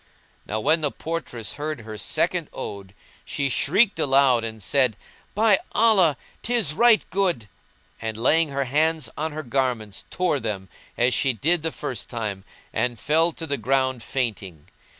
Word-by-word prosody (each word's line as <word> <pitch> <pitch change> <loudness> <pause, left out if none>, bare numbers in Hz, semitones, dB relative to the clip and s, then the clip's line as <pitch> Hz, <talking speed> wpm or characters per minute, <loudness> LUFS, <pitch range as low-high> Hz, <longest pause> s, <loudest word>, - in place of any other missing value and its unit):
Now 110 - -2
when 160 +9 +2
the 145 - +1
portress 155 -9 -5
heard 150 -2 -4
her 110 -1 -8
second - - -1
ode 100 -1 -7 0.3
she 140 -1 -2
shrieked 205 - +2
aloud 135 -3 +4
and 110 -2 -5
said, 130 -2 +2 0.4
"By 210 -1 +4
Allah! 190 - +5 0.2
'tis 230 -10 +1
right 235 +4 +4
good!"; 180 - 0 0.5
and 110 -1 -4
laying 155 +7 +3
hands 145 +3 0
on 155 +1 -2
her 155 +1 -5
garments 120 -5 -2
tore 180 -6 0
them, 100 -5 -4 0.3
as 120 +1 +3
she 135 +2 +2
did 160 +8 +1
the 160 +1 -2
first 130 -11 -5
time, 105 -5 -4 0.3
and 120 -1 -1
fell 160 +6 +2
to 165 - -6
the 140 -2 -2
ground 130 +1 +1
fainting. 105 - -3
135 Hz, 150 wpm, -24 LUFS, 115-160 Hz, 0.5 s, Allah